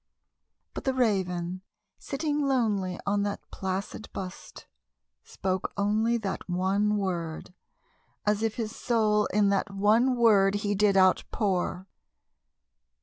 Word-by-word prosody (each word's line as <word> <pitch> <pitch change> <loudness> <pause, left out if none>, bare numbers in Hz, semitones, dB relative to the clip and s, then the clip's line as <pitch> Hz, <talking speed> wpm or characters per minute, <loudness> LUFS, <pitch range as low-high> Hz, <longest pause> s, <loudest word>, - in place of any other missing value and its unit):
But - - -7
the 265 -1 +1
Raven, 185 -6 0 0.4
sitting 295 +1 -2
lonely 210 -9 0
on 200 0 +1
that 205 0 -3
placid 190 +3 -4
bust, 185 -1 -8 0.6
spoke 190 -1 -3
only 215 +4 +2
That 195 -4 -5
one 195 +4 +1
word, 175 -4 -3 0.7
as 210 0 +1
if 225 -1 -1
his 225 -2 -4
soul 215 -3 +2
in 205 0 +2
that 200 +1 0
one 215 +6 +3
word 205 -4 +4
he 205 0 -1
did 200 0 +3
outpour. 185 -1 +1
205 Hz, 115 wpm, -28 LUFS, 190-220 Hz, 0.7 s, word